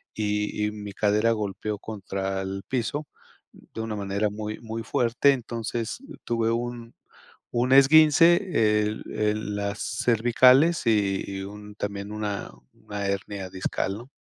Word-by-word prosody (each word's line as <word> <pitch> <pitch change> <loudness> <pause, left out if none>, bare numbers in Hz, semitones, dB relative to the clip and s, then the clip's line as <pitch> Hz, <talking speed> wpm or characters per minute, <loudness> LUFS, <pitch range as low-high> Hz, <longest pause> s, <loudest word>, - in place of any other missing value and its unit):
y 105 0 -1
y 105 - -1
mi 105 -1 -7
cadera 105 +3 +2
golpeó 105 0 -3
contra 95 -2 -4
el 95 0 -5
piso 135 +4 -2 0.5
de 110 - -10
una 110 -1 -3
manera 100 +1 -1
muy, 105 +1 -5
muy 115 0 -6
fuerte. 120 +5 +2
Entonces, 115 - -4
uh, 275 - -11
tuve 115 -1 0
un 120 0 -4 0.6
un 125 +2 0
esguince, 150 - +5
el 105 +1 -4
el 105 -1 -1
las 100 +1 -3 0.3
cervicales 125 +6 +4
y 100 -3 +2 0.2
y - - -4
un 105 +1 -9
también, 100 0 -5
una 105 -2 -4 0.2
una 100 -1 -6
hernia 100 -1 -3
discal, 95 +2 -2
¿no? 120 +3 -12
105 Hz, 140 wpm, -26 LUFS, 100-120 Hz, 0.6 s, esguince